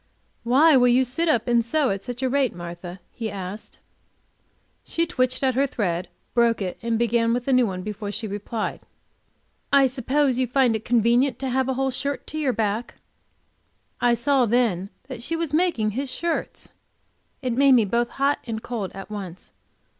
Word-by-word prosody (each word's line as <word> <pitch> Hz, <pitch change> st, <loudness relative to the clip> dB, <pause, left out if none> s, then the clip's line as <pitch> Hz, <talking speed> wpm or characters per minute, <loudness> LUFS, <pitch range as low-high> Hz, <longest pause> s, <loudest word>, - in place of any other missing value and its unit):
"Why 275 Hz, +6 st, +5 dB
will 250 Hz, -1 st, +5 dB
you 250 Hz, +2 st, +4 dB
sit 275 Hz, +7 st, -1 dB
up 240 Hz, -6 st, +1 dB
and 240 Hz, -1 st, +3 dB
sew 280 Hz, +3 st, +1 dB
at 195 Hz, 0 st, -4 dB
such 245 Hz, +1 st, -6 dB
a -, -, +2 dB
rate, 265 Hz, -4 st, +1 dB
Martha?" 175 Hz, +1 st, -8 dB
he 225 Hz, -2 st, -4 dB
asked. 195 Hz, +1 st, -7 dB, 1.1 s
She 335 Hz, -, 0 dB
twitched 255 Hz, -5 st, -1 dB
at 260 Hz, -1 st, +3 dB
her 275 Hz, +3 st, +2 dB
thread, 180 Hz, -7 st, -2 dB, 0.2 s
broke 235 Hz, -1 st, +3 dB
it, 185 Hz, -3 st, -4 dB
and 230 Hz, -1 st, 0 dB
began 230 Hz, 0 st, +2 dB
with 245 Hz, +1 st, -4 dB
a 270 Hz, -, +3 dB
new 250 Hz, -2 st, +4 dB
one 185 Hz, -2 st, -5 dB
before 210 Hz, 0 st, -5 dB
she 220 Hz, +2 st, -4 dB
replied. 210 Hz, +2 st, -4 dB, 0.9 s
"I 275 Hz, -1 st, +6 dB
suppose 260 Hz, +1 st, +1 dB
you 255 Hz, -, +1 dB
find 250 Hz, -2 st, +3 dB
it 220 Hz, -, -4 dB
convenient 240 Hz, +3 st, +2 dB
to 270 Hz, -, -3 dB
have 260 Hz, +1 st, 0 dB
a 265 Hz, -, 0 dB
whole 265 Hz, 0 st, 0 dB
shirt 280 Hz, +2 st, -3 dB
to 310 Hz, -, -5 dB
your 285 Hz, -4 st, +1 dB
back." 220 Hz, 0 st, -2 dB, 1.1 s
I 240 Hz, -1 st, +4 dB
saw 250 Hz, +1 st, +2 dB
then 210 Hz, -5 st, +1 dB, 0.2 s
that 255 Hz, -4 st, -7 dB
she 330 Hz, +7 st, -2 dB
was 330 Hz, -3 st, -3 dB
making 310 Hz, -11 st, +2 dB
his 265 Hz, +5 st, -3 dB
shirts! 335 Hz, +5 st, -3 dB, 0.7 s
It 250 Hz, -2 st, 0 dB
made 275 Hz, +2 st, +5 dB
me 235 Hz, -4 st, +5 dB
both 235 Hz, +4 st, 0 dB
hot 280 Hz, +1 st, 0 dB
and 220 Hz, -1 st, -4 dB
cold 220 Hz, -6 st, -4 dB
at 195 Hz, +2 st, -9 dB
once. 190 Hz, -4 st, -7 dB
240 Hz, 185 wpm, -24 LUFS, 215-265 Hz, 1.1 s, I